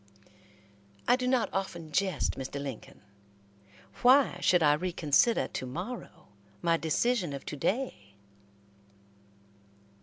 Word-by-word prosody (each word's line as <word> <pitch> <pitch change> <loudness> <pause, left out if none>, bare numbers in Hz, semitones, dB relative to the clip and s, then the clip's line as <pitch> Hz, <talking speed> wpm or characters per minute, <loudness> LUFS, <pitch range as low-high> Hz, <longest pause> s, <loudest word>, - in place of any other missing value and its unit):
"I - - +6
do 250 0 -2
not 255 -2 +1
often 175 -5 -4
jest, 190 0 0
Mr. 135 +1 -5
Lincoln. 135 -5 -8 1.0
Why 255 -6 +5
should 180 -2 +4
I 145 -1 +5
reconsider 170 +6 +2
to - - -5
morrow 180 - -7 0.3
my 165 +8 +2
decision 170 +2 0
of 140 - -7
to - - -5
day." 140 - -3
175 Hz, 110 wpm, -29 LUFS, 145-235 Hz, 1.0 s, I